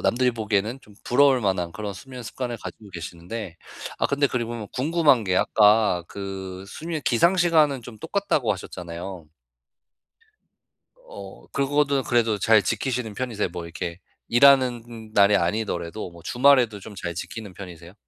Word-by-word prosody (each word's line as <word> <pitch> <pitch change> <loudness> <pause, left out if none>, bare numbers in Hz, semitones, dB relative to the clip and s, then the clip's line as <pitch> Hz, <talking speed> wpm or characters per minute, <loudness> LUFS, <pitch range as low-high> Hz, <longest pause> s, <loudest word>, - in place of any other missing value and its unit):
남들이 125 +1 +2
보기에는 110 +1 -1
좀 105 -4 -19
부러울 135 0 +4
만한 95 -5 -1
그런 105 -2 -5
수면 125 +6 -10
습관을 120 +1 -5
가지고 105 - -9
계시는데. 85 +2 -7 0.4
아 - - +2
근데 140 0 +1
그리고 115 -3 -3
궁금한 145 -3 +2
게 90 -1 +1
아까 105 -4 +4
그 95 -1 -7
수면 160 +3 -5
기상 170 +10 +3
시간은 155 -7 +3
좀 115 -1 -11
똑같다고 145 - 0
하셨잖아요. 90 -1 -7 1.8
어 - - -11
그거는 140 0 +1
그래도 115 -4 +1
잘 110 +1 +5
지키시는 120 +1 -2
편이세요? 115 -4 -2
뭐 90 -1 -6
이렇게 85 0 -6 0.3
일하는 120 -3 +3
날이 100 0 +6
아니더라도 90 0 -2
뭐 85 -1 -15
주말에도 125 -1 +3
좀 105 +2 -10
잘 85 -3 -5
지키는 105 +2 -7
편이세요? 90 -2 -11
110 Hz, 335 characters per minute, -24 LUFS, 95-130 Hz, 1.8 s, 날이